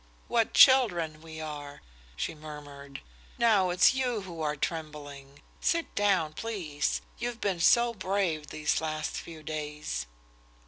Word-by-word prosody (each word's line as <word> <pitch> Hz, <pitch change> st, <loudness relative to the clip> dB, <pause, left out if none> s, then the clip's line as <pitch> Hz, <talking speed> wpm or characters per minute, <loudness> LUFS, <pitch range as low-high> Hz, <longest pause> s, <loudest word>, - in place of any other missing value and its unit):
"What 230 Hz, -2 st, +1 dB
children 175 Hz, -, +6 dB
we 160 Hz, -1 st, -9 dB
are!" 145 Hz, -2 st, -7 dB, 0.3 s
she -, -, -3 dB
murmured. 145 Hz, -2 st, -10 dB, 0.4 s
"Now 210 Hz, -6 st, +4 dB
it's 180 Hz, +8 st, +5 dB
you 250 Hz, -4 st, -1 dB
who 175 Hz, -4 st, -8 dB
are 150 Hz, -1 st, 0 dB
trembling! 145 Hz, -3 st, -6 dB, 0.2 s
Sit 335 Hz, -1 st, 0 dB
down, 190 Hz, -7 st, +2 dB
please. 175 Hz, -9 st, -2 dB, 0.2 s
You've 240 Hz, 0 st, -3 dB
been 190 Hz, -4 st, -1 dB
so 235 Hz, +7 st, +5 dB
brave 185 Hz, -6 st, -1 dB
these 150 Hz, 0 st, 0 dB
last 155 Hz, -1 st, -3 dB
few 160 Hz, -2 st, -8 dB
days." 150 Hz, -, -4 dB
160 Hz, 130 wpm, -29 LUFS, 150-205 Hz, 0.4 s, children